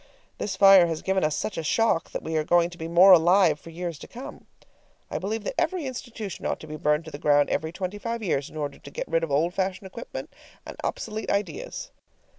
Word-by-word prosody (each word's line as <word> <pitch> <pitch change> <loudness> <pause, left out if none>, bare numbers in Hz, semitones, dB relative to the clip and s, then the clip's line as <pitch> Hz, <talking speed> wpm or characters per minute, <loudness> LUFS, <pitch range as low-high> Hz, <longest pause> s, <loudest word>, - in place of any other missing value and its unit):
This 195 - -2
fire 195 -2 +8
has 165 -2 -4
given 190 -1 +1
us 155 0 +1
such 215 - -3
a - - -3
shock 195 +1 +1
that - - -5
we 160 - -3
are 155 - +2
going 175 +2 +3
to 175 - -11
be 160 - -4
more 175 +3 +7
alive 175 -2 +5
for 165 - -12
years 170 -2 -5
to - - -10
come. 250 +3 -10 0.6
I - - -2
believe 215 +3 -3
that - - -3
every 365 -5 -1
institution 240 -6 -6
ought - - -1
to - - -8
be 155 - -6
burned 150 +1 +1
to 160 - -9
the 145 - -7
ground 145 -1 +3
every 160 0 -1
twenty 185 +3 -5
five 230 +1 -4
years 145 -8 -1
in - - -11
order 145 -2 -4
to - - -11
get - - -5
rid 165 0 +1
of 165 - -2
old 155 +5 +1
fashioned 190 0 -2
equipment 210 +5 -8 0.3
and - - -8
obsolete 220 0 -4
ideas. - - -3
175 Hz, 235 wpm, -26 LUFS, 160-205 Hz, 0.6 s, fire